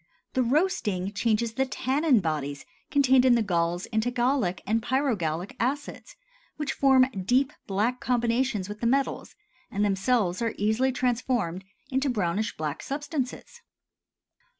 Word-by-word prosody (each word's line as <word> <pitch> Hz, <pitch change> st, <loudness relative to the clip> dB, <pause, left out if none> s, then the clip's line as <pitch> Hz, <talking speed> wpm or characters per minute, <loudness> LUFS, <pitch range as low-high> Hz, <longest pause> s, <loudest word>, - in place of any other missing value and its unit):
The 260 Hz, -, +2 dB
roasting 230 Hz, -, 0 dB
changes 225 Hz, +1 st, 0 dB
the 265 Hz, +3 st, +1 dB
tannin 265 Hz, -1 st, +2 dB
bodies 145 Hz, -4 st, -3 dB, 0.2 s
contained 265 Hz, -3 st, +4 dB
in 255 Hz, -2 st, +5 dB
the 230 Hz, -, +2 dB
galls 175 Hz, -2 st, 0 dB
into 220 Hz, +2 st, +1 dB
gallic 245 Hz, -6 st, 0 dB
and 225 Hz, +2 st, +1 dB
pyrogallic 220 Hz, -, -1 dB
acids 285 Hz, -, -3 dB, 0.4 s
which 300 Hz, -1 st, -2 dB
form 265 Hz, -2 st, +5 dB
deep 250 Hz, +8 st, +1 dB
black 215 Hz, +6 st, 0 dB
combinations 240 Hz, -4 st, 0 dB
with 210 Hz, +1 st, -7 dB
the 235 Hz, -, 0 dB
metals, 270 Hz, +3 st, 0 dB, 0.3 s
and 205 Hz, +1 st, 0 dB
themselves 195 Hz, -1 st, +1 dB
are 230 Hz, -2 st, -1 dB
easily 220 Hz, +6 st, +1 dB
transformed 240 Hz, -7 st, -1 dB, 0.3 s
into 270 Hz, +2 st, +1 dB
brownish 210 Hz, -2 st, -1 dB
black 155 Hz, -2 st, -3 dB
substances. 290 Hz, -, -4 dB
235 Hz, 130 wpm, -27 LUFS, 195-260 Hz, 0.4 s, in